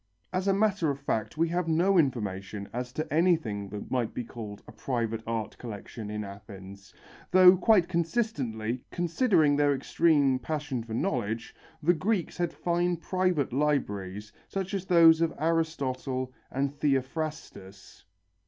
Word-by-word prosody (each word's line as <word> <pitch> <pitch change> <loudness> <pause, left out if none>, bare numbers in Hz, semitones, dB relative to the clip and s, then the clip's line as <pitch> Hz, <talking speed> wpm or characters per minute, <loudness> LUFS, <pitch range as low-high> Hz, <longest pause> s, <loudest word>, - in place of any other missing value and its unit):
As 185 +1 -1
a - - +5
matter 200 -5 +2
of 140 -1 -2
fact, 110 -3 -2
we 165 +1 +2
have 175 0 -1
no 175 +5 +3
information 100 - -2
as 125 +1 -4
to 155 0 -4
anything 155 - +1
that 105 +1 -7
might 125 -3 -1
be 125 - -2
called 110 -3 -9
a - - -10
private 115 -1 -2
art 115 -2 -3
collection 110 -1 -7
in 105 0 -3
Athens, 100 -1 -11 0.4
though 185 0 +8
quite 185 -1 +4
consistently, 145 - -1
considering 175 - +2
their 145 -1 +3
extreme 140 -3 +2
passion 145 -2 -3
for 110 -1 -6
knowledge, 115 - -2 0.3
the 175 +3 +5
Greeks 185 +1 -1
had 175 -1 0
fine 175 0 0
private 180 -6 0
libraries, 105 -9 -1
such 195 0 -4
as 195 -2 -2
those 165 -3 +6
of 165 -1 +1
Aristotle 140 -5 -1 0.2
and 140 +1 -1
Theophrastus. 135 - -3
145 Hz, 145 wpm, -28 LUFS, 110-170 Hz, 0.4 s, though